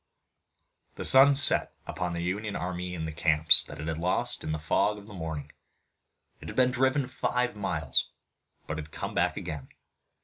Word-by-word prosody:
The - - -6
sun 135 +1 +6
set 140 - +7
upon 90 -1 -5
the 85 0 -5
Union 100 +4 -4
army 90 0 -5
in 80 -2 -6
the 80 - -6
camps 75 0 +4
that - - -12
it 75 - -7
had 80 -1 -4
lost 90 +2 -1
in 80 - -5
the 80 - -3
fog 100 +6 -1
of 100 - -13
the 105 - -14
morning. 80 -5 -7 0.9
It - - -12
had - - -9
been 125 0 +2
driven 130 +1 -1
five 125 -2 -3
miles 85 -9 -2 0.6
but 75 0 -6
had 75 0 -9
come - - -7
back - - -1
again. 70 -4 -8
90 Hz, 180 wpm, -26 LUFS, 80-110 Hz, 0.9 s, set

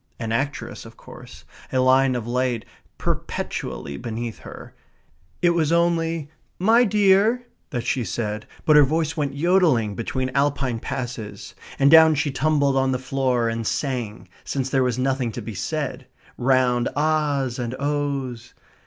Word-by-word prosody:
An 115 -1 -3
actress 135 +5 -3
of - - -14
course, - - -13 0.3
a - - 0
line 130 0 +4
of 120 -3 -3
light 125 -1 -1 0.3
perpetually 70 -1 -4
beneath 115 - -5
her. - - -11 0.7
It 175 - +5
was 165 -2 +1
only 165 -2 +1 0.3
"My 225 +6 +4
dear" 210 +3 +3 0.2
that 120 -6 -4
she 125 0 0
said, 105 0 -4 0.2
but 155 - +5
her 150 - +9
voice 155 +2 0
went 140 -3 -2
jodelling 155 - +2
between 130 +4 -3
Alpine 140 -3 0
passes. 125 -5 -6 0.2
And 140 +1 +4
down 160 -1 +8
she 145 0 0
tumbled 140 -1 +1
on 135 0 +2
the 130 - 0
floor, 130 -2 0
and 115 -1 -2
sang, 125 -6 -3 0.2
since 135 -1 -3
there 135 - +2
was 125 -2 0
nothing 130 -2 0
to - - -5
be 115 - -6
said, 95 - -4 0.3
round 125 -1 +2
ah's 145 -4 0
and 120 0 -3
oh's. 140 -4 -3
135 Hz, 150 wpm, -23 LUFS, 120-150 Hz, 0.7 s, her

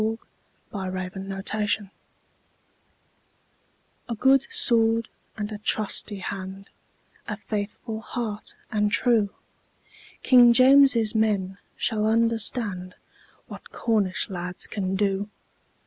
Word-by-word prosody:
"Trelawny"[edit] 195 +2 -3 2.2
A 230 - -2
good 265 +4 +3
sword 230 - +3 0.3
and 210 0 -4
a 210 - -6
trusty 210 -1 +1
hand! 195 +1 -7 0.6
A 215 - -4
merry 205 -1 0 0.3
heart 220 -2 -6 0.2
and 210 -1 +1
true! 225 -3 +3 0.9
King 245 -2 +7
James's 255 -3 +5
men 200 -3 0 0.2
shall 215 -2 0
understand 225 -4 0 0.5
What - - -12
Cornish 210 -5 -1
lads 180 -2 -6
can 190 -2 -3
do! 200 0 -1
210 Hz, 85 wpm, -25 LUFS, 195-230 Hz, 2.2 s, King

